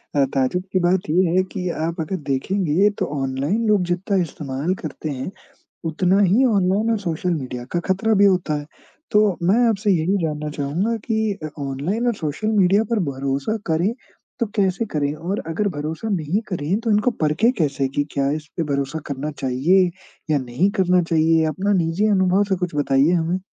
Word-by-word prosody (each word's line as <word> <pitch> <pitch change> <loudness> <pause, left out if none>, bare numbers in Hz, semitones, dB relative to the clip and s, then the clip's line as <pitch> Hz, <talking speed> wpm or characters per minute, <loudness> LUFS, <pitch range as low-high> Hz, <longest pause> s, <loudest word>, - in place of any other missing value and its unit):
अ, 140 - +4
ताजुब 135 +7 0
की 185 - +3
बात 175 -1 +1
ये 180 +4 +3
है 185 - +4
कि 180 -3 -2 0.2
आप 170 0 -5
अगर 160 +4 -3
देखेंगे 185 +6 +2
तो - - +1 0.2
ऑनलाइन 140 +12 -1
लोग 210 -3 +4
जितना 190 +3 0
इस्तेमाल 150 0 -3
करते 155 0 -5
हैं 135 +4 -4 0.5
उतना 180 +4 +2
ही 205 +7 +4
ऑनलाइन 205 0 +2
और 225 - +2
सोशल 180 -1 -1
मीडिया 125 -5 -5
का 175 - 0
ख़तरा 195 +6 +1
भी - - +7
होता 180 -5 +2
है। 145 - -8 0.5
तो 210 -4 +3
मैं 205 +6 +4
आपसे 210 -2 +1
यही 180 +3 +2
जानना 150 -1 -2
चाहूँगा 165 +11 0
कि 220 -2 0
अ, 155 - -3
ऑनलाइन 145 - -2
और 240 - +2
सोशल 155 +4 -3
मीडिया 195 +2 +4
पर 230 - +2
भरोसा 135 +10 -2
करें 170 +6 +1 0.5
तो 235 - +2
कैसे 195 +1 +1
करें 145 -6 -1
और 175 +6 -3
अगर 180 +6 -1
भरोसा 155 +8 -4
नहीं 185 +1 0
करें 180 +2 -1
तो 230 -1 -1
इनको 210 +4 +3
परखें 160 +10 +3
कैसे 140 -4 0
कि 145 - +2
क्या 140 0 0
इस 155 0 -3
पे 170 - +1
भरोसा 140 0 -2
करना 140 +2 -3
चाहिए 150 +7 +2 0.4
या 150 - +4
नहीं 130 +9 0
करना 180 -3 +3
चाहिए? 165 -1 +3
अपना 185 +7 -1
निज़ी 175 +3 +1
अनुभव 190 -1 +3
से 190 - +2
कुछ 180 -3 -3
बताइए 145 +2 +3
हमें। 175 +1 +1
175 Hz, 185 wpm, -21 LUFS, 150-200 Hz, 0.5 s, भी